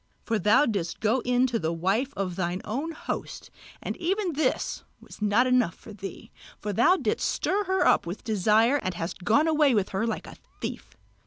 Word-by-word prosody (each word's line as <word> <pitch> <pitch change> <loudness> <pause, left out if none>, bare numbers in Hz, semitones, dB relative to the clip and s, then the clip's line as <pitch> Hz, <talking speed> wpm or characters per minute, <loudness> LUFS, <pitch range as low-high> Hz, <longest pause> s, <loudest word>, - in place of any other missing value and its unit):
For 225 -2 0
thou 210 +10 +4
didst 200 - -2
go 220 +4 +2
in 250 +1 +2
to 240 -3 0
the 160 -3 -1
wife 195 +11 0
of 185 -3 -2
thine 180 0 -2
own 280 +10 -3
host; 315 - -6 0.3
and - - -3
even 370 +1 -1
this 285 -2 -1 0.2
was - - -14
not 210 +4 +3
enough 250 -8 +2
for 215 - -12
thee, 195 -2 -9 0.3
but 205 -2 -4
thou 355 - +5
didst - - 0
stir 405 +2 0
her 375 0 +1
up - - +3
with 175 +4 -6
desire 220 +4 +3
and 185 -10 -3
hast 175 +2 -5
gone 290 - +3
away 300 -5 +4
with 200 -3 +1
her 195 +4 -1
like 225 - -3
a - - -11 0.2
thief. - - -6
225 Hz, 195 wpm, -27 LUFS, 195-280 Hz, 0.3 s, thou